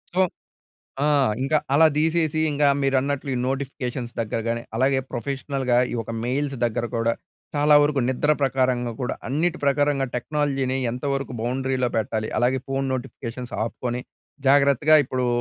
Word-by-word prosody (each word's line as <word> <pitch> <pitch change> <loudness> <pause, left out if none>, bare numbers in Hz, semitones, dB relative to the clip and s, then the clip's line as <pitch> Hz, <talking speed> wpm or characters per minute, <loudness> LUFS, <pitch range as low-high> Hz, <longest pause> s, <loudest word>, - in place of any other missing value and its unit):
So, 190 - +4 0.8
ఆ! - - +3 0.4
ఇంకా 150 +3 +2 0.2
అలా 160 +2 +7
తీసేసి 160 -1 +1
ఇంకా 145 0 +3
మీరన్నట్లు 135 +1 0
ఈ - - -1
నోటిఫికేషన్స్ 130 -3 -4
దగ్గరగాని, 115 +1 -2
అలాగే 130 +2 +3
ప్రొఫెషనల్‌గా 135 0 -1 0.2
ఈ - - -2
యొక్క 115 0 -4
మెయిల్స్ 135 +2 -1
దగ్గర 120 0 -1
కూడా. 115 0 +1 0.4
చాలా 150 +1 +4
వరకు 145 -1 +1
నిద్ర 130 +3 +1
ప్రకారంగా 130 -3 +1
కూడా 125 - -1
అన్నిటి 160 +6 0
ప్రకారంగా 140 -1 +2
టెక్నాలజీని 135 0 -1
ఎంతవరకు 135 +2 -3
బౌండరీలో 130 +1 0
పెట్టాలి, 110 0 -2
అలాగే 125 +2 +2
ఫోన్ 135 0 -1
నోటిఫికేషన్స్ 125 -1 -6
ఆపుకొని 120 +1 -3 0.5
జాగ్రత్తగా 140 +2 +5
ఇప్పుడు 130 0 -1
135 Hz, 130 wpm, -24 LUFS, 125-145 Hz, 0.8 s, అలా